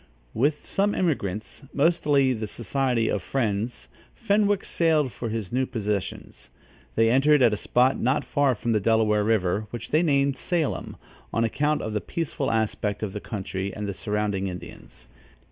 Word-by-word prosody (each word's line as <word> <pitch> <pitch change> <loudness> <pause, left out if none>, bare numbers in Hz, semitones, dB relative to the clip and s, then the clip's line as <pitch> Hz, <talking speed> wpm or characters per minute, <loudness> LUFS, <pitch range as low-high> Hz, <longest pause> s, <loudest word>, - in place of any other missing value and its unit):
With 145 +5 0
some 205 +1 +1
emigrants, 110 - -2
mostly 145 -3 +3
of 120 - -2
the 110 - -3
society 120 +2 0
of 100 - 0
Friends, 110 0 -2 0.3
Fenwick 205 -2 +1
sailed 155 -5 +2
for 115 +3 -4
his 110 -4 -4
new 130 +1 0
possessions. 105 -4 -4 0.5
They 115 0 +4
entered 140 +2 +5
at 115 -3 +5
a - - +2
spot 125 +5 +2
not 130 +5 +1
far 140 -3 +2
from 115 +2 -2
the 110 - +3
Delaware 105 0 +2
River, 105 -1 +1
which 120 +1 -7
they 155 - +4
named 140 -4 +2
Salem, 170 -5 -2 0.4
on 115 - +1
account 145 +6 0
of 110 - -3
the 105 - -1
peaceful 155 -4 -3
aspect 110 -2 -1
of 100 -3 -3
the 105 - -5
country 95 -2 -4
and 105 -1 -4
the 100 - -3
surrounding 105 -1 -1
Indians. 90 -8 -10
115 Hz, 165 wpm, -25 LUFS, 105-145 Hz, 0.5 s, entered